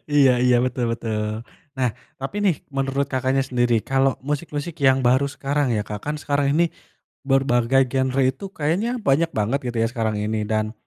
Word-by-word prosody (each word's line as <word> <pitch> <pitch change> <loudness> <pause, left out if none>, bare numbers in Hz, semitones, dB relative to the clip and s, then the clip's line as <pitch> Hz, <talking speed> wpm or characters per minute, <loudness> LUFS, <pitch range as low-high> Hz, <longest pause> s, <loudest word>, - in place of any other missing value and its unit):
Iya 140 -3 +6
iya, 125 -1 +5
betul 125 -1 -1
betul. 110 -1 -3 0.4
Nah 125 -3 +2 0.3
tapi 135 +10 -5
nih 180 -7 +3 0.2
menurut 135 +1 0
Kakaknya 130 +1 +1
sendiri, 120 -3 +1
kalau 135 0 +2
musik-musik 150 +2 -4
yang 135 -1 +3
baru 130 +3 +3
sekarang 140 -2 -1
ya 105 - 0
Kak, 105 0 -6
kan 150 - -1
sekarang 145 -1 0
ini 170 +1 +3 0.6
berbagai 135 -1 +3
genre 130 0 +1
itu 130 +9 0
kayaknya 185 +12 0
banyak 155 +5 +2
banget 110 +6 0
gitu 120 -1 -3
ya 115 - +2
sekarang 110 -3 -1
ini 105 0 -2
dan 110 0 0
135 Hz, 170 wpm, -22 LUFS, 120-140 Hz, 0.6 s, Iya